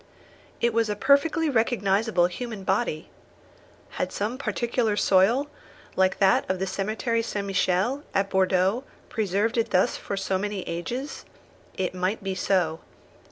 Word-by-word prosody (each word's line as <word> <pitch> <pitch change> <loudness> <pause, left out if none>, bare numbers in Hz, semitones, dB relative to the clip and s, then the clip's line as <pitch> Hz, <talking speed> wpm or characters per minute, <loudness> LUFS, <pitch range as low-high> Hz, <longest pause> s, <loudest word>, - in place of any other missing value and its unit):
It 235 -1 +2
was 225 -1 +1
a 210 - -1
perfectly 285 +7 +3
recognisable 220 -6 +2
human 215 +3 -5
body. 190 -5 -1 0.9
Had - - -1
some 220 +6 -3
particular 235 -5 0
soil, 205 +10 +4 0.5
like 190 0 +2
that 190 -1 +4
of 185 - +1
the 190 - -1
cemetery 215 +5 -1
St. 205 -3 -3
Michel, 195 +7 +1
at 195 0 +2
Bordeaux, 190 +5 +2 0.3
preserved 220 +2 0
it 230 0 0
thus 185 -2 +2
for 200 - -5
so 190 -1 -1
many 205 -1 -3
ages? 240 - -4 0.5
It 185 -1 -1
might 185 +3 -2
be 195 -1 -2
so. 180 -4 0
200 Hz, 140 wpm, -26 LUFS, 190-230 Hz, 0.9 s, soil